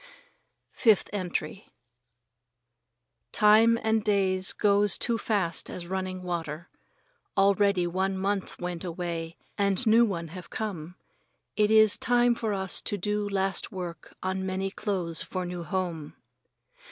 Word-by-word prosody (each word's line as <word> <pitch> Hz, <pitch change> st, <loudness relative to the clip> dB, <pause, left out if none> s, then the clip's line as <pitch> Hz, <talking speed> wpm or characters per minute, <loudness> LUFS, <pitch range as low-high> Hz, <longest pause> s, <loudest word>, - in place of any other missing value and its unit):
Fifth 220 Hz, -5 st, +3 dB
Entry 185 Hz, -2 st, -4 dB, 1.6 s
Time 220 Hz, +2 st, +5 dB
and 220 Hz, -1 st, +1 dB
days 190 Hz, -2 st, +2 dB
goes 205 Hz, -1 st, +2 dB
too 230 Hz, -1 st, -1 dB
fast 200 Hz, -6 st, -1 dB
as 175 Hz, -, -6 dB
running 185 Hz, 0 st, -4 dB
water. 170 Hz, -2 st, -5 dB, 0.7 s
Already 200 Hz, -1 st, +3 dB
old 185 Hz, +3 st, 0 dB
month 195 Hz, +1 st, -2 dB
went 175 Hz, -1 st, -5 dB
away 170 Hz, -2 st, -5 dB, 0.2 s
and 200 Hz, +3 st, +3 dB
new 225 Hz, +2 st, +6 dB
one 170 Hz, -7 st, -2 dB
have 180 Hz, +1 st, -10 dB
come. 180 Hz, -6 st, -5 dB, 0.6 s
It 210 Hz, -1 st, +2 dB
is 220 Hz, -1 st, +5 dB
time 245 Hz, 0 st, +3 dB
for 225 Hz, -2 st, -3 dB
us 190 Hz, -2 st, -2 dB
to 205 Hz, -, -2 dB
do 210 Hz, +1 st, -2 dB
last 195 Hz, 0 st, -1 dB
work 180 Hz, -3 st, -7 dB
on 190 Hz, 0 st, -2 dB
many 190 Hz, +1 st, -2 dB
clothes 180 Hz, -6 st, +1 dB
for 185 Hz, -1 st, -4 dB
new 175 Hz, 0 st, -5 dB
home. 170 Hz, -3 st, -4 dB
190 Hz, 130 wpm, -27 LUFS, 175-210 Hz, 1.6 s, new